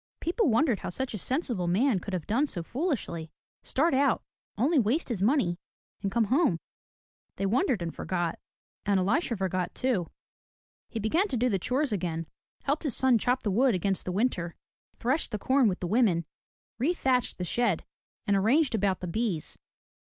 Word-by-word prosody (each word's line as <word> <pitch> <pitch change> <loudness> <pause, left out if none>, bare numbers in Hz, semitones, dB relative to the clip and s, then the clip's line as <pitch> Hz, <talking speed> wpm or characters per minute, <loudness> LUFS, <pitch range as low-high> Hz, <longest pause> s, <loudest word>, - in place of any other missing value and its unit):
People 345 - +1
wondered 235 - +3
how - - -5
such 255 +8 -3
a - - -2
sensible 245 - -1
man 210 +4 +2
could 200 - -7
have 170 - -4
done 260 +8 +1
so 175 -10 -4
foolishly, 235 - -2 0.2
— - - -79
start 315 +4 +1
out, 270 -2 +2 0.3
only 280 +7 +3
waste 255 +9 +1
his 220 -6 -2
money 200 -7 +2 0.4
and 195 - -1
come 235 +1 +2
home. 250 - +2 0.8
They 195 - -2
wondered 240 - +1
and 165 - -4
forgot. 175 -2 -2 0.4
And 200 -2 +2
Elisha 230 - +1
forgot, 185 -1 -2
too. 235 -10 0 0.8
He 225 - -4
began 320 - +2
to 255 - -2
do 250 +2 +2
the 195 -4 +1
chores 260 - 0
again, 170 -4 -2 0.4
helped 285 +2 0
his 290 -7 +1
son 260 -3 +4
chop 250 +3 0
wood 225 +4 +3
against 195 +1 -1
the 185 - -2
winter, 180 -5 0 0.4
threshed 265 +7 0
the 215 - -3
com 260 +4 +3
with 190 -3 -1
the - - -1
women, 190 -6 +2 0.5
rethatched 260 -3 +1
the 180 - -3
shed, 210 0 +1 0.4
and 200 -2 +2
arranged 245 +10 +3
about 200 -3 +1
the 180 - -4
bees. 185 -3 -2
225 Hz, 175 wpm, -28 LUFS, 185-265 Hz, 0.8 s, son